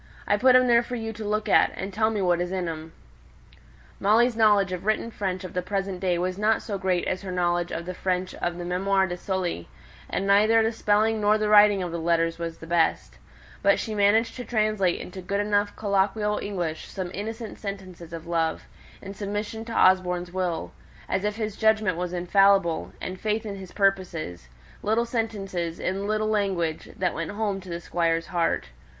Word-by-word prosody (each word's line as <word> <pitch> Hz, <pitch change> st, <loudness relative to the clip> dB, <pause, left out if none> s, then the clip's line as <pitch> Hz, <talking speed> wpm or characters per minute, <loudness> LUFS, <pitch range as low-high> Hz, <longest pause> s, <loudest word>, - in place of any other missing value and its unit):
I 205 Hz, -, +4 dB
put 255 Hz, +4 st, +5 dB
'em 255 Hz, 0 st, +6 dB
there 235 Hz, -1 st, +5 dB
for 245 Hz, +1 st, -5 dB
you 225 Hz, -1 st, -4 dB
to 220 Hz, 0 st, -7 dB
look 210 Hz, +1 st, -1 dB
at; -, -, +4 dB
and 195 Hz, +1 st, -5 dB
tell 220 Hz, +1 st, +2 dB
me 210 Hz, -3 st, -1 dB
what 175 Hz, -1 st, +2 dB
is 175 Hz, 0 st, -2 dB
in 185 Hz, -2 st, -2 dB
'em." 160 Hz, 0 st, -6 dB, 1.1 s
Molly's 230 Hz, +4 st, +3 dB
knowledge 205 Hz, -4 st, +4 dB
of 180 Hz, -1 st, -4 dB
written 215 Hz, +2 st, 0 dB
French 190 Hz, -3 st, -3 dB
of 185 Hz, -, -7 dB
the 180 Hz, -, -1 dB
present 195 Hz, 0 st, -3 dB
day 180 Hz, -2 st, +1 dB
was 185 Hz, +2 st, -2 dB
not 215 Hz, +1 st, +2 dB
so 205 Hz, -3 st, -4 dB
great 185 Hz, -2 st, 0 dB
as 185 Hz, -, -2 dB
her 195 Hz, -2 st, -6 dB
knowledge 175 Hz, -1 st, 0 dB
of 170 Hz, +1 st, -4 dB
the 185 Hz, -, -4 dB
French 185 Hz, 0 st, -2 dB
of 175 Hz, 0 st, -3 dB
the 175 Hz, -, -5 dB
MÄmoires 190 Hz, +2 st, +1 dB
de 175 Hz, -, -4 dB
Sully, 180 Hz, -, -3 dB, 0.4 s
and 195 Hz, -, -2 dB
neither 215 Hz, +3 st, +5 dB
the 225 Hz, -, +1 dB
spelling 220 Hz, 0 st, +1 dB
nor 210 Hz, +1 st, +4 dB
the 215 Hz, -1 st, 0 dB
writing 205 Hz, -2 st, +6 dB
of 175 Hz, -, -4 dB
the 170 Hz, -, -3 dB
letters 165 Hz, 0 st, +1 dB
was 165 Hz, -1 st, -4 dB
of -, -, -26 dB
the -, -, -7 dB
best; 165 Hz, 0 st, 0 dB, 0.4 s
but 200 Hz, 0 st, +4 dB
she 220 Hz, -, -4 dB
managed 215 Hz, +3 st, +3 dB
to 250 Hz, -, -5 dB
translate 215 Hz, -6 st, +1 dB
into 185 Hz, +1 st, -8 dB
good 200 Hz, +2 st, -2 dB
enough 205 Hz, 0 st, +1 dB
colloquial 205 Hz, +1 st, 0 dB
English 175 Hz, -6 st, -3 dB
some 185 Hz, -2 st, -5 dB
innocent 225 Hz, +2 st, -6 dB
sentences 185 Hz, -4 st, -7 dB
of 165 Hz, -1 st, -7 dB
love, 165 Hz, -1 st, -1 dB, 0.4 s
and 200 Hz, 0 st, -7 dB
submission 205 Hz, +2 st, -4 dB
to 230 Hz, -, -8 dB
Osborne's 180 Hz, -3 st, +3 dB
will 180 Hz, -3 st, -2 dB, 0.4 s
as 190 Hz, -, -1 dB
if 210 Hz, 0 st, -1 dB
his 215 Hz, -2 st, -3 dB
judgment 220 Hz, -4 st, +2 dB
was 180 Hz, +1 st, -3 dB
infallible, 180 Hz, -1 st, +3 dB
and 185 Hz, -, -4 dB
of -, -, -22 dB
faith 215 Hz, +1 st, -1 dB
in 205 Hz, -2 st, -4 dB
his 190 Hz, -2 st, -10 dB
purposes, 180 Hz, -, -1 dB, 0.3 s
little 225 Hz, +3 st, +1 dB
sentences 195 Hz, -8 st, -3 dB
in 195 Hz, +2 st, -2 dB
"little 215 Hz, 0 st, 0 dB
language" 190 Hz, -7 st, -1 dB
that 180 Hz, -1 st, 0 dB
went 165 Hz, 0 st, -4 dB
home 205 Hz, -2 st, -2 dB
to 185 Hz, -, -12 dB
the 170 Hz, 0 st, -4 dB
Squire's 165 Hz, -1 st, 0 dB
heart. 170 Hz, -, -1 dB
195 Hz, 205 wpm, -25 LUFS, 175-210 Hz, 1.1 s, em